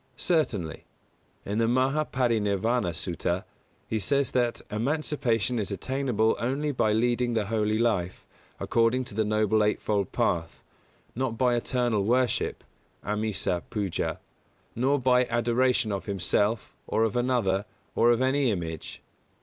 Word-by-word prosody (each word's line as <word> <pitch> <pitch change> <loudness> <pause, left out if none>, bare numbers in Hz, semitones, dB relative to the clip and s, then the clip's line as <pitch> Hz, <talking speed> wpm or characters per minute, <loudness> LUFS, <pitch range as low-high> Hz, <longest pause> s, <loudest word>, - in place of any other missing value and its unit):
Certainly. 115 - 0 0.6
In 105 +3 -2
the 115 - +3
Mahā 130 +5 +1
Pari 120 -3 +2
Nirvāna 105 0 0
Sutta 85 +2 -2 0.4
he 110 - -1
says 140 +5 +1
that 120 -2 +1
emancipation 120 - 0
is 100 - -2
attainable 110 +1 0
only 140 +5 -1
by 110 -5 +1
leading 120 +2 +1
the 110 -2 +1
Holy 110 0 0
life, 105 -6 0 0.3
according 115 +3 +2
to 125 - -10
the 110 +2 +1
Noble 110 0 +2
Eight 105 - +1
fold 100 -3 -1
Path, 85 -1 -1 0.5
not 120 -2 -2
by 125 -1 +3
eternal 120 -3 0
worship 125 +2 0 0.4
(āmisa 105 -4 -1
pūjā), 100 -6 -2 0.6
nor 135 +4 +2
by 125 0 +3
adoration 120 0 +1
of 100 +1 -4
himself, 100 +3 0
or 110 - +1
of 115 0 0
another, 120 -6 +1 0.3
or 120 - +4
of 120 +2 +3
any 135 0 +2
image. 80 -6 -5
115 Hz, 135 wpm, -27 LUFS, 105-125 Hz, 0.6 s, or